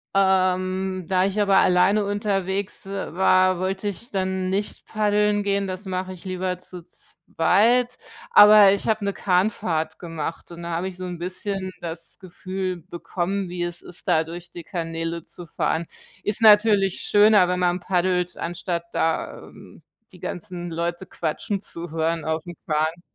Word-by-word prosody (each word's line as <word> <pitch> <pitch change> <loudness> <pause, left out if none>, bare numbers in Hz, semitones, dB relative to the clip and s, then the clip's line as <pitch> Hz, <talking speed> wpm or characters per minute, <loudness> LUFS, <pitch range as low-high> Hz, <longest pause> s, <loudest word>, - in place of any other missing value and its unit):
Ähm, 185 -1 +1
da 185 -1 +2
ich 200 +2 -1
aber 200 -2 +4
alleine 185 +4 +4
unterwegs 200 -1 -2
w - - -10 0.2
war, 185 0 +4
wollte 190 +2 -2
ich 205 +5 -6
dann 190 -1 -1
nicht 200 +2 -3
paddeln 210 -1 +1
gehen, 200 -1 0
das 185 +2 -6
mache 185 0 -3
ich 185 0 -11
lieber 185 -1 -2
zu 180 -2 -11
zweit, 235 +8 +1 0.3
aber 205 -1 +8
ich 200 - -2
habe 215 -2 +1
'ne 200 - 0
Kahnfahrt 180 -4 0
gemacht 165 0 -6
und 170 0 -9
da 170 - -4
habe 175 +3 -2
ich 180 - -12
so 185 - -5
'n 175 -1 -5
bisschen 185 +2 -4
das 165 -1 -7
Gefühl 185 0 -4
bekommen, 185 +2 -3
wie 175 0 -4
es 175 0 -5
ist, 175 - -10
da 160 0 +2
durch 175 +1 -9
die 175 - -9
Kanäle 165 -2 -4
zu 175 -2 -12
fahren. 165 +1 -1 0.4
Ist 210 +3 -1
natürlich 210 -3 +5
schöner, 205 -3 +5
wenn 180 0 -1
man 180 0 +1
paddelt, 180 0 0
anstatt 170 0 -3
da, 165 0 -1
ähm, - - -15 0.3
die 180 - -15
ganzen 175 0 -5
Leute 170 +2 -3
quatschen 185 +6 -3
zu 170 -3 -8
hören 165 0 -1
aufm 160 +2 -3
Kahn. 160 +2 0
185 Hz, 160 wpm, -23 LUFS, 175-195 Hz, 0.4 s, aber